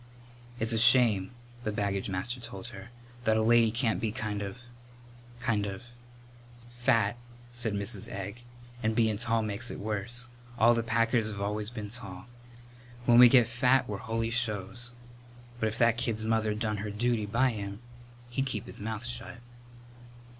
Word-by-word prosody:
"It's 115 -1 +1
a 110 - +2
shame," 115 -5 +5 0.3
the 105 - -1
baggage 100 -1 -2
master 95 +7 -1
told 120 0 -8
her, 100 -1 -10 0.3
"that 110 -2 +3
a 110 - +2
lady 115 0 +5
can't 110 -4 0
be 110 -1 0
kind 105 -1 -3
of 100 +2 -5 0.8
kind 110 -5 0
of 95 +1 -6 0.5
" 120 0 -21
"Fat," 115 -3 +3 0.3
said 120 -3 +3
Mrs. 100 -1 -1
Egg; 100 +4 -6 0.4
"and 110 0 0
bein' 110 -2 +2
tall 115 -1 +1
makes 110 +3 -3
it - - -6
worse. 110 +4 -2 0.3
All 120 +2 +6
the 115 - +1
Packers 115 0 +1
've 100 -2 -6
always 105 +1 -2
been 105 -4 -7
tall. 105 -5 -5 0.8
When 120 0 +6
we 125 -1 +10
get 120 -2 +6
fat 125 +2 +2
we're 105 - -3
holy 115 0 -2
shows. 120 +1 +1 0.7
But 110 - +1
if 110 - -7
that 115 -1 +4
kid's 110 -3 -1
mother's 110 -1 +1
done 105 -1 -1
her 105 +1 -4
duty 110 0 0
by 125 +5 +2
him 100 -2 -6 0.5
he'd 135 +2 -1
keep 110 -6 -3
his - - -9
mouth 110 +1 -4
shut." 120 0 -5
110 Hz, 170 wpm, -29 LUFS, 105-120 Hz, 0.8 s, we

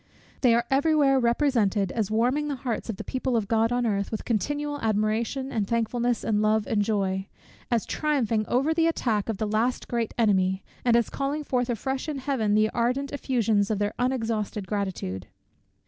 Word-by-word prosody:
They 240 -3 +5
are 235 0 +1
every 285 +4 +3
where 275 -3 +4
represented 235 -6 +2
as 215 -4 -1
warming 250 +7 +1
the 285 - -2
hearts 240 -3 -4
of 215 - -3
the - - -5
people 260 -2 -1
of 210 -3 -1
God 225 +1 +2
on 245 0 +1
earth 200 -3 0
with 220 - -5
continual 290 +6 -1
admiration, 225 +5 0
and 210 -4 -1
thankfulness, 235 +1 0
and 210 -1 +1
love, 215 0 +2
and 215 -3 +1
joy; 195 -2 -1 0.4
as 235 -3 +1
triumphing 240 -8 0
over 275 +6 +2
the 330 0 +2
attack 225 -10 0
of 220 - -1
the 215 - -1
last 220 +4 0
great 235 -2 -2
enemy, 190 -4 +2 0.2
and 240 -2 +4
as 235 -1 +2
calling 280 +2 -2
forth 250 -3 -1
afresh 265 +6 -2
in 295 - -3
Heaven 255 -6 0
the 215 0 +3
ardent 255 +4 -1
effusions 225 -7 +1
of 215 - 0
their 205 +1 -1
unexhausted 225 -5 -1
gratitude. 185 - -3
230 Hz, 185 wpm, -26 LUFS, 215-265 Hz, 0.4 s, They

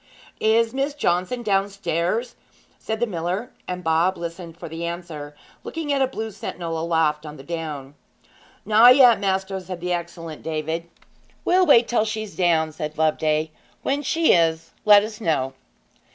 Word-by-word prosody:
'Is 225 +1 +2
Miss 275 +2 -1
Johnson 185 0 0
downstairs?' 200 +2 -1 0.4
said 220 0 -4
the 240 - +2
miller; 185 +3 -3 0.2
and 180 0 -4
Bob 165 +3 +2
listened 170 0 -7
for 170 - -8
the 165 +1 -6
answer, 170 -4 -6 0.3
looking 315 -3 -3
at 275 - +1
a 265 - +3
blue 220 -4 -5
sentinel 165 -4 -5
aloft 160 -2 +1
on 150 -1 -9
the 135 - -11
down. 150 -4 -5 0.7
'Not 225 +4 +7
yet, 250 -5 +7
maister,' 190 -1 -1
said 185 -1 -7
the 180 +1 -2
excellent 170 -2 -6
David. 160 +1 -3 0.6
'We'll 365 0 +4
wait 235 -5 +6
till 230 -2 +1
she's 215 -1 -4
down,' 165 -3 +2
said 155 0 -6
Loveday. 155 0 +1 0.3
'When 280 +1 0
she 320 +3 +3
is, 165 -1 +1
let 205 -1 +8
us 215 0 -7
know.' 135 -8 0
180 Hz, 155 wpm, -23 LUFS, 160-220 Hz, 0.7 s, let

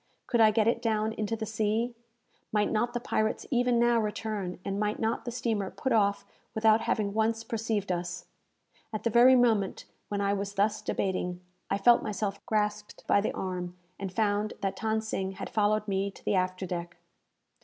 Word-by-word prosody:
Could 240 -3 +2
I 220 - +8
get 215 0 +2
it 230 - +2
down 220 -1 0
into 215 0 -2
the 220 0 -4
sea? 220 +2 0 0.6
Might 210 -1 +1
not 240 +2 0
the - - +1
pirates 215 -2 -1
even 245 -1 +3
now 235 0 +4
return, 210 -3 -3
and 195 0 -2
might 210 0 0
not 225 +1 -1
the 240 - -3
steamer 220 -5 -1
put 265 - -3
off 200 -3 +2 0.3
without 220 0 +4
having 210 -3 0
once 225 +1 +1
perceived 220 -3 -2
us? 175 0 -3 0.7
At 215 - -4
the 230 - +1
very 245 +3 +7
moment 225 -6 +2 0.2
when 205 - -2
I 200 0 +1
was 200 0 -3
thus 210 +2 +1
debating, 180 -2 -2 0.3
I 195 - +1
felt 235 +4 +5
myself 205 -2 -3
grasped 210 -1 -2
by 200 - +4
the - - -1
arm, 180 -1 -4 0.2
and 195 -1 -4
found 210 +1 0
that 195 -1 -2
Than 220 +1 0
Sing 195 -3 -3
had - - -7
followed 215 0 +1
me 195 0 0
to 195 - -16
the - - +1
after 185 0 0
deck. 175 -1 -5
215 Hz, 185 wpm, -29 LUFS, 195-225 Hz, 0.7 s, I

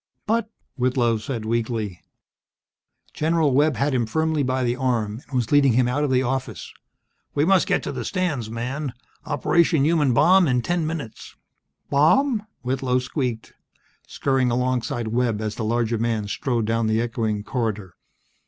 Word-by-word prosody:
"But 225 0 0
" - - -48
Whitlow 125 -2 +2
said, 110 0 -5
weakly. 110 -4 -2 1.1
General 160 -2 +1
Webb 145 +1 +3
had 140 +5 0
him 120 -3 0
firmly 160 +4 0
by 130 -1 0
the 120 0 0
arm, 120 -4 -1
and 135 - -7
was 120 -3 0
leading 140 -4 +5
him 125 +1 +3
out 140 +4 0
of 145 - 0
the 130 0 +2
office. 130 +1 -4 0.6
"We 145 +1 +2
must 190 +1 +3
get - - +1
to - - -3
the - - -4
stands, 155 - -2
man. 125 +4 -4 0.3
Operation 155 +1 +2
Human 155 -4 +3
Bomb 180 +9 +5
in 125 -2 +1
ten 175 0 0
minutes." 150 -9 -6 0.6
"Bomb?" 215 - +3 0.2
Whitlow 130 0 0
squeaked, 125 -2 -3 0.5
scurrying 135 -2 0
alongside 120 -2 -1
Webb 115 -2 0
as 110 -1 -3
the 115 - -5
larger 115 0 0
man 115 -2 -1
strode 120 +1 -1
down 115 0 0
the 110 0 +1
echoing 115 -3 -2
corridor. 110 -7 -3
125 Hz, 160 wpm, -23 LUFS, 115-145 Hz, 1.1 s, leading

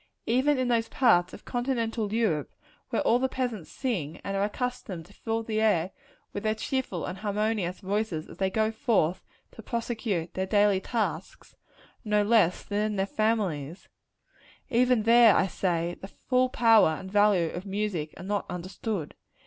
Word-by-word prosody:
Even 265 +5 +2
in 255 -1 0
those 230 -2 +1
parts 180 -9 +3
of - - -12
continental 235 -4 -2
Europe, 210 -11 0 0.4
where 235 - 0
all 240 - +3
the 265 +1 0
peasants 245 -10 -3
sing, 180 - -3
and 195 - -3
are 195 - +1
accustomed 210 -6 -4
to - - -18
fill 225 0 -3
the 220 -1 -1
air 190 -5 +2 0.4
with 205 - -4
their 215 +1 0
cheerful 220 -6 -3
and 185 +1 -6
harmonious 210 -3 -1
voices 195 -5 -2
as - - -12
they 190 -1 +1
go 220 +2 +1
forth 190 -6 +1 0.3
to - - -11
prosecute 220 -7 -3
their 190 0 -2
daily 205 -1 +3
tasks, 225 +2 -4 0.5
no 210 -2 +2
less 205 -5 +3
than 205 0 -2
in 215 -1 -1
their 195 -1 +1
families 195 -8 -1 0.8
even 245 -1 +3
there, 230 -1 +7
I - - +3
say, 175 -2 -1
the 195 - -7
full 255 +4 0
power 225 -9 +5
and 190 0 -9
value 205 -5 +3
of 180 +3 -7
music 195 -6 -3
are - - -9
not 205 +1 -2
understood. 180 0 -4
210 Hz, 165 wpm, -27 LUFS, 185-230 Hz, 0.8 s, there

